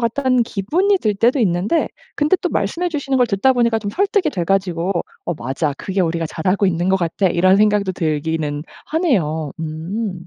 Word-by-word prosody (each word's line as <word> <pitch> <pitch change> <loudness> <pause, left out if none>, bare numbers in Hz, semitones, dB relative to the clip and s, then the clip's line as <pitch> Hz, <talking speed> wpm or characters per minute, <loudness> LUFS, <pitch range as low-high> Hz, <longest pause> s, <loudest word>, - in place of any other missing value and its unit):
같다.'는 250 +1 +1
기분이 325 - +1
들 215 - 0
때도 240 +7 +2
있는데 195 - +1 0.3
근데 300 +5 +3
또 - - 0
말씀해 355 +1 -1
주시는 280 -4 -1
걸 250 -1 +4
듣다 220 +5 +2
보니까 235 -2 +2
좀 205 -2 -4
설득이 390 - +1
돼 175 -10 -2
가지고 185 -1 0 0.3
'어 175 - -2
맞아. 140 +3 -2
그게 195 0 -2
우리가 165 -1 -1
잘하고 185 +6 0
있는 175 0 0
것 190 - +4
같아.' 180 +2 0
이런 185 +2 +4
생각도 210 -2 +2
들기는 155 -2 -2 0.2
하네요. 165 - 0
음. 175 +4 -4
195 Hz, 370 characters per minute, -19 LUFS, 170-245 Hz, 0.3 s, 걸